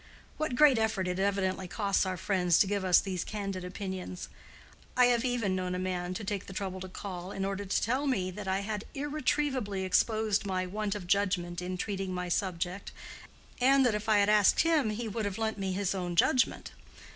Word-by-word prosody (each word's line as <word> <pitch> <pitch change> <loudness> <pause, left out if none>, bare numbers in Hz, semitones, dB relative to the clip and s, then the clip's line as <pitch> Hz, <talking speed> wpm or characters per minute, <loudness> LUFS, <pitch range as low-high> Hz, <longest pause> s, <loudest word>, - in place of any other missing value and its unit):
—What 310 -5 -1
great 275 -3 +6
effort 220 -4 0
it 180 +1 -2
evidently 190 -1 0
costs 200 0 0
our 185 -1 -2
friends 180 -3 +2
to - - +5
give 200 0 -1
us 185 -2 +6
these 185 -3 -3
candid 195 -3 -4
opinions! 185 0 -6 0.7
I 250 - +7
have 240 -1 +3
even 240 -7 0
known 180 -1 -2
a - - -2
man 180 -1 -2
to 215 - -4
take 200 -1 -3
the 190 - -8
trouble 190 -1 -4
to 185 0 -7
call, 185 -1 -6
in 195 -1 -3
order 195 +1 -3
to 190 - 0
tell 260 +6 0
me 190 -9 0
that 205 +1 -7
I 190 +1 0
had 210 0 -4
irretrievably 275 -7 -1
exposed 215 +2 +2
my 185 -2 -1
want 205 +2 -2
of 200 -3 -6
judgment 180 -2 0
in 180 +1 -4
treating 195 -1 -3
my 180 0 -3
subject, 180 +1 -2 0.7
and 270 +1 +5
that 240 - +3
if 210 +1 -3
I 215 - +5
had 200 0 +4
asked 210 -2 +5
him 295 -11 +2
we 235 -1 -3
would 220 0 -3
have 200 -2 -3
lent 220 -1 -2
me 190 -1 -1
his 200 0 0
own 180 -2 -3
judgment. 250 +9 +2
195 Hz, 205 wpm, -30 LUFS, 185-220 Hz, 0.7 s, I